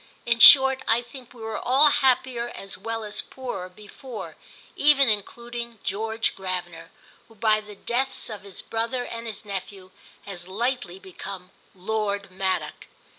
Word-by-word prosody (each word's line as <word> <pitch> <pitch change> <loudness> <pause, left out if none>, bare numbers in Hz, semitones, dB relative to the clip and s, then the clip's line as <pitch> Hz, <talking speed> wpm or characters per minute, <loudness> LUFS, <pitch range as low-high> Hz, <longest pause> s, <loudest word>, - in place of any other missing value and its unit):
In 230 -1 +2
short 265 +1 +9
I 230 +2 +3
think 245 0 -12
we 235 -3 -12
were 220 0 -3
all 280 +4 +5
happier 255 -3 +2
as 195 0 -6
well 225 +2 -4
as 210 0 -3
poorer 240 -9 -6
before; 215 +5 -10 0.4
even 285 -2 +5
including 235 +2 -2
George 220 +2 -1
Gravener, 180 -3 -5 0.4
who 225 - -19
by 215 0 +2
the 210 -1 -12
deaths 255 +6 -2
of 215 -3 -7
his 200 -2 -8
brother 235 +2 -2
and 230 0 -6
his 215 -1 -6
nephew 195 -1 -7 0.3
has 180 -3 -6
lately 235 -1 -2
become 190 0 -9 0.2
Lord 200 0 -2
Maddock. 190 0 -3
220 Hz, 145 wpm, -25 LUFS, 195-240 Hz, 0.4 s, short